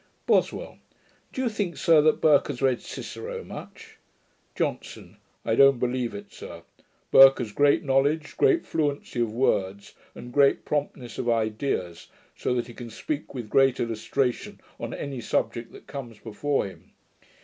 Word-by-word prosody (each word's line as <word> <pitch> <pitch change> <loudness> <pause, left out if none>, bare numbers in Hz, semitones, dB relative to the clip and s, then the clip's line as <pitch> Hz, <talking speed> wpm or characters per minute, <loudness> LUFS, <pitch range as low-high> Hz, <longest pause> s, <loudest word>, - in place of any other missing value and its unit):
BOSWELL. - - 0 0.5
'Do 260 - -3
you - - +1
think, 205 -6 -3
sir, 165 -3 +5
that 155 +1 +2
Burke 150 -3 +5
has 140 -4 -5
read 130 -3 +1
Cicero 470 +1 -7
much?' 445 -1 -11 0.6
JOHNSON. - - -4 0.3
'I - - +1
don't 135 -1 +6
believe 125 -2 -1
it, 100 0 -10
sir. - - -10 0.5
Burke 135 0 +9
has 115 -4 -4
great 145 +6 +3
knowledge, 145 +3 +1
great 395 -6 +3
fluency 145 -5 -2
of 115 -2 0
words, 100 -5 -1 0.2
and 120 0 -10
great 140 -1 +3
promptness 140 -5 -3
of 120 - -1
ideas, 110 -6 -1 0.3
so 125 - -1
that 120 - -1
he 120 - -11
can 120 0 -9
speak 145 +6 -5
with 120 -4 -5
great 135 +2 +3
illustration 120 +3 -2 0.2
on - - -5
any 135 -4 -5
subject 115 0 -2
that - - -14
comes 120 -6 -8
before 125 +7 -2
him. 95 - -12
135 Hz, 155 wpm, -26 LUFS, 115-145 Hz, 0.6 s, Burke